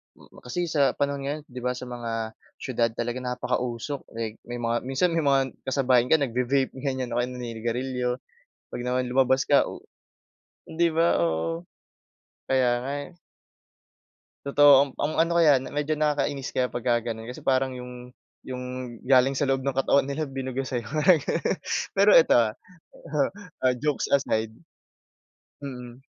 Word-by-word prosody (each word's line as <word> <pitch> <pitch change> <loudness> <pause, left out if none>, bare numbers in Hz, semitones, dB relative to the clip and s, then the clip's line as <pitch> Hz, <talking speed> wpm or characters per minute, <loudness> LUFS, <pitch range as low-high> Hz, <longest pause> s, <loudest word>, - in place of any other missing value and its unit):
hmm, - - -19
kasi 170 +8 -2
sa 145 -3 +3
panahon 140 -1 -2
ngayon, 145 +2 -3
'di 125 0 -7
ba? 125 - +1
Sa 125 0 -8
mga 115 -2 -4 0.2
siyudad 120 -3 0
talaga 120 +1 -3
napakausok, 125 +1 -3 0.2
eh. 110 -1 -4
May 120 0 -6
mga 120 +1 -1
minsan 135 +7 +1
may 165 -2 0
mga 135 -1 +3 0.2
kasabayan 130 -2 +2
ka 160 - +4
nagvi-vape 130 +1 0
ganiyan 130 -2 -2
o - - -1
kaya 120 - +1
naninigarilyo. 125 +1 -3 0.5
Pag - - -6
naman 125 0 0
lumabas 130 +1 +2
ka 145 - +5
u - - -7 0.9
di 170 +1 +1
ba? 165 - +2
Oo, 80 +1 -1 0.8
kaya 130 -2 +2 0.2
nga 140 - -3 0.2
eh. 175 - -21 1.3
Totoo 145 +1 +6 0.2
amp 130 - -14
ang 155 +2 -1
ano 165 +1 +3
kaya 150 -6 +6
medyo 150 +3 -2
nakakainis 145 -2 0
kaya 125 -1 +1
pagka 120 -1 0
gano'n. 110 0 -7
Kasi 125 - -8
parang 130 0 +1
yung, 125 0 -10 0.3
yung 125 -1 -5 0.4
galing 130 +1 +4
sa 145 - 0
loob 135 -1 +1
ng 135 - 0
katawan 135 +1 +3
nila 145 +3 -2
binuga 135 0 -3
sayo, 120 -4 -4
mga 155 +3 +4
gano'n. 165 +5 -1 0.4
Pero 200 +1 +5
ito 165 - +6
ah 110 -3 +3 0.3
uh-huh, 145 -2 -2 0.4
ah, 130 -1 +4
jokes 150 +2 -1
aside, 110 -5 0 1.1
mm. 125 -2 -8
130 Hz, 155 wpm, -26 LUFS, 125-140 Hz, 1.3 s, Totoo